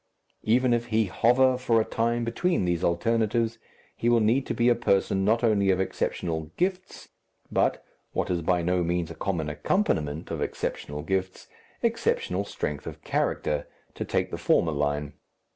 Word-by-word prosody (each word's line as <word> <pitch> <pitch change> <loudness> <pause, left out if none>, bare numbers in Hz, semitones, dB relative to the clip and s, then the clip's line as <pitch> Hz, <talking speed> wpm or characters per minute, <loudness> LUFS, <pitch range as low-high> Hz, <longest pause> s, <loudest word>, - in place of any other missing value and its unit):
Even 120 +2 +3
if 120 0 0
he 110 -1 +2
hover 125 +6 +3
for 120 -3 +3
a 110 - +1
time 115 +1 0
between 120 - 0
these 85 -1 0
alternatives, 115 +5 +1 0.4
he 120 - 0
will 120 -1 +5
need 115 +5 +2
to - - -2
be 120 - +2
a 120 - +6
person 100 -4 +1
not 115 +4 +2
only 105 -4 +3
of 95 -1 +3
exceptional 80 -4 -2
gifts, 185 +1 -2 0.4
but - - +1 0.3
what - - -1
is 85 -1 0
by 85 +1 +1
no 90 +1 +1
means 85 -1 -1
a - - -5
common 85 -3 -2
accompaniment 75 - -1
of - - -3
exceptional 75 0 -3
gifts, 95 +2 -2 0.4
exceptional 90 +2 0
strength 75 -7 -4
of - - -8
character, 75 -1 -1 0.3
to - - -4
take - - -1
the - - -4
former 80 - +2
line. 75 0 -1
100 Hz, 165 wpm, -27 LUFS, 85-120 Hz, 0.4 s, a